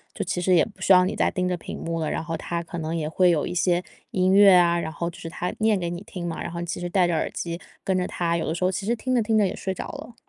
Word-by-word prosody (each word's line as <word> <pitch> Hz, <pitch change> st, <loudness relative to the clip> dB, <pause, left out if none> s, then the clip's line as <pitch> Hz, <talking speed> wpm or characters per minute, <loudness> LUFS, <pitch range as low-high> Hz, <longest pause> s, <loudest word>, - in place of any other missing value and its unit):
就 205 Hz, -, -2 dB
其 180 Hz, -1 st, -2 dB
实 185 Hz, +1 st, +3 dB
也 165 Hz, -, +5 dB
不 200 Hz, -4 st, -15 dB
需 190 Hz, -, +2 dB
要 180 Hz, 0 st, +6 dB
你 -, -, -2 dB
再 -, -, +2 dB
盯 180 Hz, 0 st, -1 dB
着 180 Hz, -, 0 dB
屏 -, -, -7 dB
幕 165 Hz, 0 st, -3 dB
了， 155 Hz, -, -1 dB
然 -, -, -2 dB
后 165 Hz, 0 st, -3 dB
它 170 Hz, -1 st, -3 dB
可 170 Hz, +1 st, -7 dB
能 160 Hz, +1 st, -3 dB
也 155 Hz, -2 st, -2 dB
会 180 Hz, +3 st, +3 dB
有 155 Hz, -4 st, +1 dB
一 -, -, -4 dB
些 175 Hz, 0 st, +2 dB, 0.3 s
音 185 Hz, 0 st, +2 dB
乐 200 Hz, 0 st, +8 dB
啊， 170 Hz, -1 st, +4 dB
然 165 Hz, -, -3 dB
后 170 Hz, +1 st, -3 dB
就 170 Hz, -, -13 dB
是 165 Hz, -, -6 dB
它 175 Hz, +2 st, -3 dB
念 215 Hz, -1 st, +3 dB
给 170 Hz, -1 st, -2 dB
你 175 Hz, +1 st, -5 dB
听 180 Hz, -4 st, -6 dB
嘛， 165 Hz, -, -4 dB
然 -, -, -4 dB
后 170 Hz, -, -5 dB
你 -, -, -3 dB
其 170 Hz, -, -4 dB
实 175 Hz, -, -3 dB
戴 180 Hz, 0 st, +3 dB
着 175 Hz, -, 0 dB
耳 160 Hz, -, 0 dB
机 170 Hz, 0 st, -4 dB, 0.2 s
跟 190 Hz, -1 st, +1 dB
着 180 Hz, -, 0 dB
它， 170 Hz, -1 st, -1 dB
有 165 Hz, -, -2 dB
的 160 Hz, -, 0 dB
时 175 Hz, -, -3 dB
候 185 Hz, -, +3 dB
其 195 Hz, +1 st, -4 dB
实 235 Hz, +3 st, +1 dB
听 255 Hz, +2 st, -2 dB
着 240 Hz, -, +3 dB
听 220 Hz, 0 st, +1 dB
着 210 Hz, -, +4 dB
也 -, -, -3 dB
睡 190 Hz, -, -3 dB
着 -, -, -6 dB
了。 235 Hz, -, -9 dB
175 Hz, 365 characters per minute, -24 LUFS, 170-190 Hz, 0.3 s, 乐